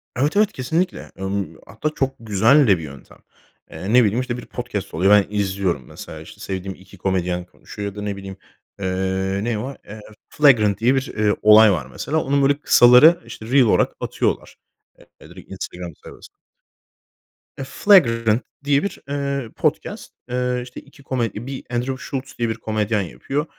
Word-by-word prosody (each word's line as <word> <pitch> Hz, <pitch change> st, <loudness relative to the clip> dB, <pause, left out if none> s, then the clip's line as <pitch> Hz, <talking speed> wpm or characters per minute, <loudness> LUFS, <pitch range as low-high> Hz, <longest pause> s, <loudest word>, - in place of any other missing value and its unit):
Evet, 145 Hz, +9 st, 0 dB
evet, 210 Hz, 0 st, +4 dB
kesinlikle. 160 Hz, +8 st, -2 dB
Imm, 95 Hz, 0 st, -3 dB
hatta 110 Hz, +9 st, -3 dB
çok 135 Hz, -3 st, -2 dB
güzel 115 Hz, +6 st, +4 dB
de 95 Hz, -3 st, +5 dB
bir 80 Hz, -, -8 dB
yöntem. 70 Hz, -2 st, -12 dB, 0.5 s
Eee, 95 Hz, +7 st, -4 dB
ne 125 Hz, 0 st, +7 dB
bileyim, 110 Hz, +3 st, +1 dB
işte, 125 Hz, -1 st, -4 dB
bir -, -, -9 dB
podcast 120 Hz, -6 st, -6 dB
oluyor. 95 Hz, +5 st, +4 dB
Ya, 105 Hz, -, +5 dB
ben 105 Hz, -, -8 dB
izliyorum 95 Hz, -8 st, -1 dB
mesela, -, -, -10 dB
işte, -, -, -13 dB
sevdiğim 95 Hz, 0 st, -5 dB
2 95 Hz, +1 st, -16 dB
komedyen 90 Hz, -1 st, -1 dB
konuşuyor 100 Hz, +3 st, -8 dB
ya -, -, -18 dB
da 105 Hz, -, -6 dB
ne 105 Hz, -1 st, -3 dB
bileyim, 95 Hz, -1 st, -9 dB, 0.4 s
eee, 95 Hz, 0 st, -1 dB
ne 115 Hz, -2 st, -1 dB
o? 135 Hz, +5 st, -5 dB
Eee, 105 Hz, +2 st, -10 dB, 0.3 s
Flagrant 110 Hz, -9 st, +4 dB
diye 125 Hz, +4 st, +3 dB
bir, 135 Hz, 0 st, -2 dB
eee, 105 Hz, -1 st, +2 dB
olay 105 Hz, 0 st, +7 dB
var 80 Hz, -8 st, -1 dB
mesela. 150 Hz, -, -3 dB
Onun 140 Hz, +1 st, +1 dB
böyle 140 Hz, +1 st, +2 dB
kısaları, 125 Hz, +9 st, +7 dB
işte, 115 Hz, -1 st, -10 dB
Reel 130 Hz, +3 st, +4 dB
olarak 110 Hz, -, +2 dB
atıyorlar. -, -, -2 dB, 0.6 s
Eee, -, -, -15 dB
direkt -, -, -14 dB
Instagram 90 Hz, -1 st, -7 dB
sayfasına. -, -, -13 dB, 1.3 s
Eee, -, -, -5 dB
Flagrant 115 Hz, -, +4 dB, 0.2 s
diye 140 Hz, 0 st, +2 dB
bir, 200 Hz, -, -4 dB
eee, 140 Hz, -3 st, -2 dB
podcast, -, -, -2 dB, 0.2 s
eee, 125 Hz, 0 st, -1 dB
işte 125 Hz, 0 st, -10 dB
2 140 Hz, 0 st, -19 dB
komedi 120 Hz, -3 st, -3 dB
bir 135 Hz, -1 st, -6 dB
Andrew 125 Hz, +2 st, -2 dB
Schulz 135 Hz, -1 st, -6 dB
diye 120 Hz, -1 st, 0 dB
bir 110 Hz, -, -2 dB
komedyen 110 Hz, -1 st, -1 dB
yapıyor. 135 Hz, -, -4 dB
115 Hz, 175 wpm, -21 LUFS, 100-135 Hz, 1.3 s, ne